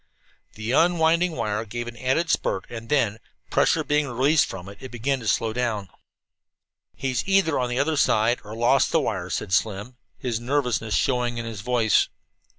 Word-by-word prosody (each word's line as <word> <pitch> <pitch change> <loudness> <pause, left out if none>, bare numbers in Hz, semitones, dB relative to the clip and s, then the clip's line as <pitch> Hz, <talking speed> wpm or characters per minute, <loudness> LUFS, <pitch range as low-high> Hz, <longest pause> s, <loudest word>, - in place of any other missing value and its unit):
The 110 +2 -4
unwinding 170 +2 +3
wire 105 -6 -2
gave 120 +2 -5
an 120 - -7
added 130 +8 0
spurt, 95 - 0
and 115 -1 -8
then, 115 -7 +1 0.3
pressure - - +3
being 150 0 +1
released 135 +5 +3
from 95 -1 -8
it, 100 0 -11
it 130 - -7
began 130 +3 -1
to 115 - -7
slow 110 +2 +1
down. 110 -6 -2 1.1
"He's 130 -3 -1
either 195 -7 +3
on 125 -1 -1
the 120 - -2
other 150 +3 +1
side, 115 -1 +3
or 105 +1 -8
lost 120 +3 +3
the 165 - +3
wire," 95 - -2
said 90 +2 -3
Slim, 105 +6 -1 0.2
his 120 -3 -2
nervousness 120 -4 0
showing 125 -2 0
in 115 - -4
his 110 -3 -6
voice. 120 -2 +2
120 Hz, 175 wpm, -24 LUFS, 110-140 Hz, 1.1 s, unwinding